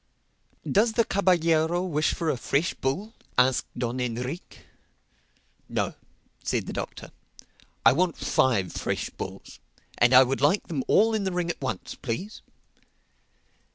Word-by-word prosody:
"Does 220 Hz, +3 st, +3 dB
the 230 Hz, 0 st, +3 dB
caballero 175 Hz, -3 st, +2 dB
wish 155 Hz, -4 st, 0 dB
for 165 Hz, -2 st, 0 dB
a -, -, -1 dB
fresh 140 Hz, +7 st, 0 dB
bull?" 190 Hz, +12 st, -3 dB, 0.2 s
asked 125 Hz, 0 st, +3 dB
Don 120 Hz, +1 st, -2 dB
Enrique. 125 Hz, +6 st, -4 dB, 1.1 s
"No," -, -, -1 dB, 0.5 s
said -, -, -1 dB
the -, -, -6 dB
Doctor, -, -, -6 dB, 0.7 s
"I 115 Hz, -, +8 dB
want 175 Hz, +2 st, +1 dB
five 100 Hz, -9 st, +1 dB
fresh -, -, -3 dB
bulls. -, -, -8 dB, 0.4 s
And 120 Hz, +1 st, +5 dB
I 130 Hz, -, +10 dB
would 135 Hz, +1 st, -2 dB
like 150 Hz, +8 st, +3 dB
them 145 Hz, -6 st, -2 dB
all 225 Hz, +2 st, +4 dB
in 215 Hz, -2 st, 0 dB
the 190 Hz, -, -1 dB
ring 175 Hz, -1 st, -1 dB
at -, -, -10 dB
once, 125 Hz, -8 st, -4 dB
please." 180 Hz, -, -5 dB
155 Hz, 140 wpm, -26 LUFS, 125-185 Hz, 1.1 s, I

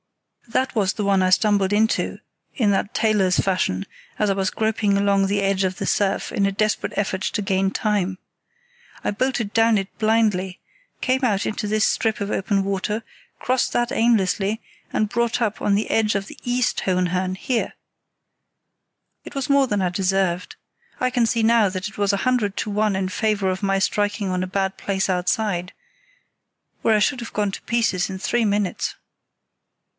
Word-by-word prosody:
That 255 Hz, +3 st, -1 dB
was 200 Hz, -4 st, +2 dB
the 210 Hz, -, -3 dB
one 195 Hz, -1 st, +3 dB
I 185 Hz, -, +3 dB
stumbled 200 Hz, 0 st, +3 dB
into 220 Hz, +2 st, +1 dB, 0.4 s
in 215 Hz, -5 st, +2 dB
that 200 Hz, +1 st, -1 dB
tailor's 210 Hz, -5 st, +2 dB
fashion, 170 Hz, -, 0 dB, 0.3 s
as 210 Hz, -, +1 dB
I -, -, +3 dB
was 195 Hz, -1 st, 0 dB
groping 215 Hz, -2 st, 0 dB
along 200 Hz, -1 st, +2 dB
the 200 Hz, +1 st, 0 dB
edge 195 Hz, 0 st, +1 dB
of 185 Hz, -1 st, -1 dB
the 195 Hz, -, -3 dB
surf 200 Hz, 0 st, 0 dB
in 200 Hz, -, +1 dB
a -, -, 0 dB
desperate 215 Hz, +1 st, 0 dB
effort 190 Hz, -2 st, -1 dB
to 210 Hz, -, -1 dB
gain 195 Hz, -1 st, +1 dB
time. 195 Hz, -3 st, -1 dB, 0.9 s
I -, -, 0 dB
bolted 235 Hz, -1 st, -1 dB
down 225 Hz, -1 st, +4 dB
it 195 Hz, 0 st, -4 dB
blindly, 215 Hz, -4 st, +1 dB, 0.4 s
came 260 Hz, +1 st, 0 dB
out 205 Hz, -5 st, +1 dB
into 210 Hz, 0 st, -2 dB
this 215 Hz, +1 st, +2 dB
strip 220 Hz, -1 st, 0 dB
of 200 Hz, 0 st, -3 dB
open 195 Hz, 0 st, 0 dB
water, 200 Hz, +3 st, -2 dB, 0.4 s
crossed 255 Hz, 0 st, 0 dB
that 240 Hz, 0 st, +1 dB
aimlessly, 215 Hz, -3 st, +2 dB, 0.3 s
and 215 Hz, -, +1 dB
brought 235 Hz, +2 st, 0 dB
up 220 Hz, -3 st, -1 dB
on 200 Hz, -, +2 dB
the 210 Hz, -, -1 dB
edge 220 Hz, -1 st, +2 dB
of 195 Hz, 0 st, -1 dB
the -, -, -12 dB
East 245 Hz, 0 st, 0 dB
Hohenhörn, 185 Hz, 0 st, 0 dB
here. 245 Hz, +2 st, -1 dB, 1.5 s
It -, -, -11 dB
was 275 Hz, +2 st, -2 dB
more 280 Hz, -1 st, +4 dB
than 205 Hz, -4 st, 0 dB
I 180 Hz, -, +1 dB
deserved. 185 Hz, -1 st, 0 dB, 0.4 s
I 255 Hz, 0 st, +1 dB
can 245 Hz, -2 st, +2 dB
see 230 Hz, 0 st, +1 dB
now 225 Hz, -2 st, +4 dB
that 185 Hz, +1 st, -4 dB
it 210 Hz, -, -11 dB
was 200 Hz, 0 st, +3 dB
a 200 Hz, -, 0 dB
hundred 235 Hz, -6 st, +1 dB
to 210 Hz, -, -2 dB
one 210 Hz, -1 st, +1 dB
in 190 Hz, 0 st, -1 dB
favour 200 Hz, 0 st, 0 dB
of 185 Hz, +2 st, -5 dB
my 195 Hz, 0 st, +2 dB
striking 205 Hz, 0 st, 0 dB
on 185 Hz, 0 st, -1 dB
a -, -, -3 dB
bad 190 Hz, 0 st, -1 dB
place 195 Hz, -1 st, -1 dB
outside, 180 Hz, 0 st, 0 dB, 1.1 s
where 220 Hz, -, +3 dB
I -, -, +3 dB
should 250 Hz, +5 st, +1 dB
have 230 Hz, -, -8 dB
gone 205 Hz, -2 st, 0 dB
to -, -, -7 dB
pieces 225 Hz, -7 st, 0 dB
in 190 Hz, -, -5 dB
three 235 Hz, +5 st, 0 dB
minutes." 205 Hz, -2 st, -1 dB
205 Hz, 185 wpm, -22 LUFS, 190-220 Hz, 1.5 s, down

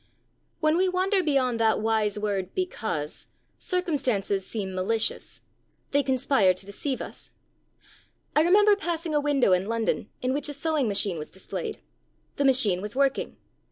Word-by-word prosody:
When 310 Hz, +1 st, +3 dB
we 375 Hz, +1 st, +3 dB
wander 375 Hz, +2 st, +1 dB
beyond 265 Hz, -7 st, +1 dB
that 220 Hz, -1 st, +3 dB
wise 215 Hz, -1 st, +1 dB
word 200 Hz, -3 st, -2 dB
'because' 215 Hz, -, -3 dB, 0.3 s
circumstances 260 Hz, -, -1 dB
seem 195 Hz, -2 st, -4 dB
malicious; 215 Hz, +5 st, -1 dB, 0.5 s
they 285 Hz, -, +3 dB
conspire 260 Hz, -8 st, +2 dB
to 185 Hz, -, -8 dB
deceive 255 Hz, +7 st, -3 dB
us. -, -, -9 dB, 1.1 s
I 300 Hz, -, +6 dB
remember 410 Hz, +5 st, +5 dB
passing 340 Hz, -4 st, -3 dB
a 295 Hz, -, +2 dB
window 285 Hz, -7 st, +2 dB
in 185 Hz, +2 st, +1 dB
London 225 Hz, -2 st, -1 dB
in 255 Hz, +1 st, +1 dB
which 295 Hz, +2 st, -2 dB
a -, -, -4 dB
sewing 300 Hz, -2 st, 0 dB
machine 200 Hz, -4 st, 0 dB
was 150 Hz, -, -7 dB
displayed. 190 Hz, -, -6 dB, 0.6 s
The 280 Hz, -, +1 dB
machine 225 Hz, -9 st, +3 dB
was 210 Hz, +3 st, -5 dB
working. 275 Hz, 0 st, 0 dB
255 Hz, 150 wpm, -26 LUFS, 205-305 Hz, 1.1 s, I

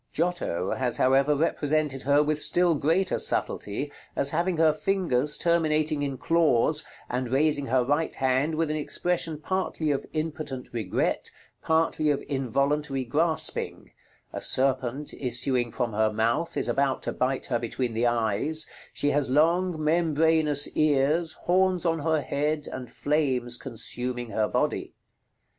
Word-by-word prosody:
Giotto 160 Hz, -, -1 dB
has, 125 Hz, -2 st, -1 dB
however, 135 Hz, +3 st, +3 dB
represented 150 Hz, -2 st, 0 dB
her, 145 Hz, +2 st, +3 dB
with 150 Hz, 0 st, -1 dB
still 170 Hz, +3 st, +3 dB
greater 165 Hz, +6 st, +1 dB
subtlety, 125 Hz, +8 st, -1 dB, 0.2 s
as 140 Hz, -, +3 dB
having 170 Hz, +2 st, 0 dB
her 160 Hz, -1 st, +4 dB
fingers 155 Hz, -6 st, +1 dB
terminating 155 Hz, -3 st, +1 dB
in 140 Hz, -2 st, -2 dB
claws, 160 Hz, -6 st, +2 dB, 0.2 s
and 125 Hz, 0 st, -3 dB
raising 145 Hz, 0 st, +2 dB
her 130 Hz, +1 st, +2 dB
right 145 Hz, +4 st, 0 dB
hand 135 Hz, +4 st, +1 dB
with 160 Hz, -1 st, 0 dB
an 155 Hz, -, -1 dB
expression 165 Hz, +1 st, -1 dB
partly 165 Hz, -3 st, -2 dB
of 140 Hz, -, -2 dB
impotent 155 Hz, -4 st, -4 dB
regret, 110 Hz, -6 st, -1 dB, 0.3 s
partly 160 Hz, -1 st, +1 dB
of 145 Hz, -, 0 dB
involuntary 140 Hz, +1 st, -1 dB
grasping; 155 Hz, +6 st, -2 dB, 0.4 s
a -, -, -4 dB
serpent, 130 Hz, +1 st, +1 dB
issuing 125 Hz, -1 st, -1 dB
from 120 Hz, -1 st, -3 dB
her 110 Hz, +1 st, +2 dB
mouth, 115 Hz, +9 st, -1 dB
is -, -, 0 dB
about 135 Hz, -1 st, 0 dB
to -, -, -2 dB
bite 130 Hz, +1 st, -1 dB
her 120 Hz, -3 st, -1 dB
between 120 Hz, +1 st, -3 dB
the 115 Hz, +2 st, +1 dB
eyes; 120 Hz, +7 st, 0 dB, 0.3 s
she 145 Hz, -, 0 dB
has 145 Hz, -2 st, +1 dB
long 165 Hz, +5 st, +2 dB
membranous 155 Hz, -2 st, +3 dB
ears, 155 Hz, +2 st, +1 dB
horns 185 Hz, 0 st, +2 dB
on 165 Hz, -1 st, +1 dB
her 160 Hz, 0 st, +1 dB
head, 150 Hz, +2 st, -2 dB
and 125 Hz, -2 st, -7 dB
flames 130 Hz, -5 st, 0 dB
consuming 120 Hz, -1 st, -4 dB
her 110 Hz, -1 st, +1 dB
body. -, -, -2 dB
145 Hz, 140 wpm, -26 LUFS, 130-160 Hz, 0.4 s, her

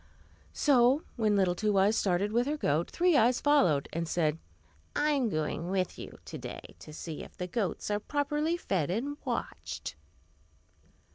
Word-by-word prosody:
So 265 Hz, +1 st, +4 dB
when 215 Hz, -3 st, +2 dB
little 190 Hz, -3 st, +3 dB
Two 205 Hz, +2 st, 0 dB
Eyes 200 Hz, +3 st, +4 dB
started 195 Hz, +1 st, +1 dB
with 240 Hz, +3 st, +2 dB
her 300 Hz, +1 st, -1 dB
goat, 160 Hz, -, 0 dB
Three 355 Hz, -1 st, +2 dB
Eyes 245 Hz, -1 st, +4 dB
followed, 270 Hz, -, +3 dB
and 165 Hz, 0 st, -2 dB
said, 160 Hz, -2 st, 0 dB, 0.6 s
"I 300 Hz, +1 st, +2 dB
am 270 Hz, -5 st, +1 dB
going 155 Hz, 0 st, -2 dB
with 185 Hz, -1 st, -1 dB
you -, -, -9 dB
to -, -, -7 dB
day, -, -, -8 dB
to -, -, -11 dB
see 155 Hz, 0 st, -6 dB
if -, -, -12 dB
the 180 Hz, -, -3 dB
goats 195 Hz, +1 st, -2 dB
are 205 Hz, -, +1 dB
properly 295 Hz, +6 st, -1 dB
fed 180 Hz, -, -1 dB
and 265 Hz, +10 st, -2 dB
watched." -, -, -4 dB
210 Hz, 165 wpm, -30 LUFS, 175-280 Hz, 0.6 s, So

